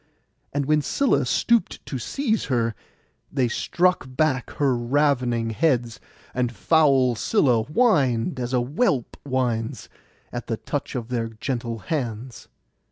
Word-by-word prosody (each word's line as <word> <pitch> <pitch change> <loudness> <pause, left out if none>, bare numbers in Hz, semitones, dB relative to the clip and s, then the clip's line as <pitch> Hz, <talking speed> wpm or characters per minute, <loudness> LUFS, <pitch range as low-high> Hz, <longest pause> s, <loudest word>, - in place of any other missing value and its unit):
And 145 0 -1
when 150 +1 +3
Scylla 275 - +1
stooped 235 -5 +1
to 130 - -4
seize 225 - -1
her, 115 -3 0 0.6
they 130 -3 +1
struck 180 +9 +1
back 130 -1 0
her 140 -3 +1
ravening 120 -2 +1
heads, 120 -4 0 0.3
and 125 -1 0
foul 135 -3 +3
Scylla 120 - +2
whined, 140 - +2
as 120 0 -3
a 125 -2 +2
whelp 140 - 0
whines, 125 -4 -2 0.4
at - - -5
the - - -2
touch - - -4
of 120 -1 -4
their 120 -2 -1
gentle 115 +1 -4
hands. 120 - -4
130 Hz, 130 wpm, -24 LUFS, 120-150 Hz, 0.6 s, when